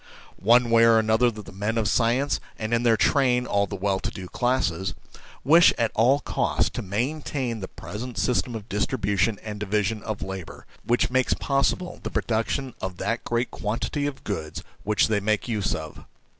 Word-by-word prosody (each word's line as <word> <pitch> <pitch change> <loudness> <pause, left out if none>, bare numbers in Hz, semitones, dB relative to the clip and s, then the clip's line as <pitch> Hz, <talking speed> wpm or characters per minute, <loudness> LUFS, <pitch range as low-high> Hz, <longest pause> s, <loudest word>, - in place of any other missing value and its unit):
One 120 +4 +4
way 115 0 +6
or 115 -1 +6
another 110 +2 +3
the 105 -2 -9
men 105 +4 -2
of 110 -2 +1
science, 125 +5 +2 0.2
and 110 +1 -3
in 115 - +3
their 115 -2 +3
train 125 -2 +3
all 100 -3 +1
the 100 - -5
well 95 0 0
to - - -3
do 95 -1 -8
classes, 95 -8 0 0.5
wish 165 +6 +7
at 115 -1 +1
all 130 +6 +3
cost - - 0
to - - -3
maintain 125 +3 -2
the 95 - -5
present 115 +2 -7
system 120 +2 0
of 110 -1 -7
distribution 105 -1 0
and 105 -1 -6
division 105 +1 -1
of 110 -1 -4
labour, 95 -3 -7 0.2
which 120 +1 +1
makes 130 0 +2
possible 145 +6 -1
the - - -4
production 120 +3 -1
of 95 -1 -4
that 115 +5 -2
great 120 +1 -1
quantity 120 +7 -2
of 140 -2 -6
goods 80 -5 -4 0.2
which 105 0 +2
they 110 -2 +1
make 105 +2 0
use 105 -5 -1
of. 80 -2 -8
110 Hz, 180 wpm, -25 LUFS, 100-125 Hz, 0.5 s, wish